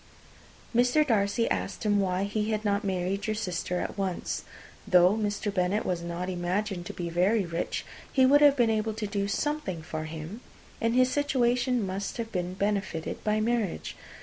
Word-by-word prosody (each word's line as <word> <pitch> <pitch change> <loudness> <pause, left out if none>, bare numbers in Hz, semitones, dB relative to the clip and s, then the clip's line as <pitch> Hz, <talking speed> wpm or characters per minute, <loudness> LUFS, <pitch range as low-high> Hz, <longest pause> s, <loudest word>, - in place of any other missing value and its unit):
Mr. 250 +5 +4
Darcy 225 -2 +2
asked - - -2
why 195 -3 +2
he 210 +1 -1
did 215 0 -1
not 200 0 +1
marry 190 0 -1
your 215 0 -1
sister 180 -3 -2
at - - -4
once. 190 -2 -2 0.4
Though 180 -1 +6
Mr. 205 -1 -1
Bennet 185 +2 +1
was 175 -2 -1
not 170 +1 -4
imagined 185 +1 -2
to - - -6
be 175 - -4
very 190 +4 +2
rich, 170 0 -3 0.3
he 260 -1 +5
would 285 +3 +6
have 290 -1 +7
been 240 -4 +3
able 220 0 0
to 220 - -3
do 200 -1 -1
something 205 - -2
for 155 0 -4
him, 160 +8 -7 0.4
and 230 0 +1
his 255 0 +4
situation 250 -4 +1
must 195 +1 -4
have 230 -1 -4
been 180 -1 -2
benefited 195 -5 -2
by 215 0 +1
marriage. 225 -4 -1
205 Hz, 175 wpm, -28 LUFS, 180-230 Hz, 0.4 s, have